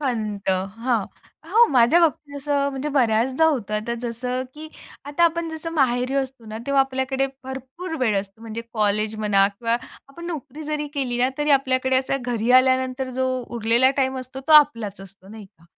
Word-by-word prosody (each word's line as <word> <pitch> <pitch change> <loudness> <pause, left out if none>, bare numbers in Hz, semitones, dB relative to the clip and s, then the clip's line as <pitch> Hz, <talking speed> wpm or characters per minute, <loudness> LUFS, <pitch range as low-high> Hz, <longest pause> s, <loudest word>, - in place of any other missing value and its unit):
खंत. 215 -7 -3 0.3
हां, 230 -3 0 0.5
हो, 470 +2 +6
माझ्या 250 +6 +5
बाबतीत 310 -3 0
असं, 280 0 0
म्हणजे 270 +2 -4
बऱ्याचदा 255 +2 +2
होतं. 230 -9 -1
आता 225 +3 -2
जसं, 250 +2 -3
की 310 +1 -9 0.4
आता 290 +4 +1
आपण 335 0 0
जसं 320 +1 -6
माहेरी 255 -3 +1
असतो 265 -3 -3
ना 215 +1 -6
तेव्हा 280 -1 +3
आपल्याकडे 265 0 0 0.2
भरपूर 265 +7 -7
वेळ 220 -5 +2
असतो. 200 +2 -14
म्हणजे 225 0 -6
कॉलेज 215 0 +1
म्हणा 200 -2 +3
किंवा 230 0 +1 0.3
आपण 340 +5 -10
नोकरी 305 -3 -6
जरी 300 0 -2
केली 250 -4 -1
ना, 255 - +4
तरी 295 0 0
आपल्याकडे 260 -1 +2
असा 265 +1 0
घरी 240 -1 -2
आल्यानंतर 260 0 0
जो 260 - +2 0.3
उरलेला 235 +4 +4
टाईम 265 0 0
असतो, 255 +1 -8
तो 295 +4 0
आपलाच 230 -10 +4
असतो 195 0 -15
नाही 215 -1 -10
का. 170 -3 -27
260 Hz, 175 wpm, -23 LUFS, 230-285 Hz, 0.5 s, हो